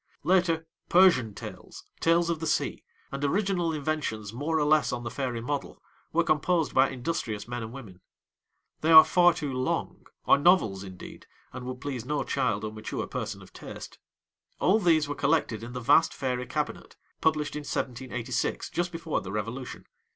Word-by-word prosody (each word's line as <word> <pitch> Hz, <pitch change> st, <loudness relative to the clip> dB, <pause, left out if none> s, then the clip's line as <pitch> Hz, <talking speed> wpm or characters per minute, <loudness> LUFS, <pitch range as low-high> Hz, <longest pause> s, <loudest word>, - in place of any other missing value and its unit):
Later, 170 Hz, -3 st, +2 dB, 0.2 s
Persian 165 Hz, -, +5 dB
Tales, -, -, -9 dB, 0.2 s
Tales 170 Hz, +1 st, +3 dB
of 165 Hz, -, -2 dB
the 160 Hz, -, -3 dB
Sea, -, -, -1 dB, 0.3 s
and 140 Hz, +1 st, -5 dB
original 180 Hz, +2 st, +1 dB
inventions, 145 Hz, -9 st, -3 dB
more 150 Hz, +6 st, -1 dB
or 150 Hz, -, +2 dB
less 155 Hz, 0 st, +3 dB
on 120 Hz, -1 st, -4 dB
the 120 Hz, -, -5 dB
fairy 125 Hz, -3 st, -3 dB
model, 140 Hz, +4 st, -4 dB, 0.3 s
were 170 Hz, +1 st, +2 dB
composed 165 Hz, +1 st, +1 dB
by 130 Hz, +1 st, +4 dB
industrious 120 Hz, -6 st, -3 dB
men 120 Hz, 0 st, -4 dB
and 110 Hz, 0 st, -6 dB
women. 105 Hz, -9 st, -11 dB, 0.8 s
They 160 Hz, -, +1 dB
are 160 Hz, -1 st, +12 dB
far 175 Hz, -1 st, +5 dB
too 145 Hz, -5 st, -3 dB
long 130 Hz, 0 st, -2 dB, 0.2 s
are -, -, +5 dB
novels, 140 Hz, -, +3 dB
indeed, 95 Hz, -2 st, -11 dB, 0.3 s
and 125 Hz, -1 st, -7 dB
would 125 Hz, 0 st, -6 dB
please 130 Hz, -5 st, -4 dB
no 145 Hz, +4 st, -1 dB
child 115 Hz, -6 st, -1 dB
or 110 Hz, -, -3 dB
mature 110 Hz, 0 st, -4 dB
person -, -, -5 dB
of -, -, -17 dB
taste. -, -, -10 dB, 0.6 s
All 205 Hz, +5 st, +4 dB
these 165 Hz, -6 st, +3 dB
were 145 Hz, -, -2 dB
collected 140 Hz, -6 st, 0 dB
in 120 Hz, +1 st, -8 dB
the 125 Hz, -, -4 dB
vast 145 Hz, +7 st, +4 dB
Fairy 125 Hz, -2 st, -2 dB
Cabinet, -, -, -4 dB, 0.3 s
published 155 Hz, -2 st, +1 dB
in -, -, -2 dB
1786, 125 Hz, -3 st, -3 dB
just 175 Hz, 0 st, -1 dB
before 165 Hz, -2 st, -2 dB
the 90 Hz, -, -7 dB
Revolution. 115 Hz, +5 st, -5 dB
140 Hz, 175 wpm, -28 LUFS, 120-165 Hz, 0.8 s, are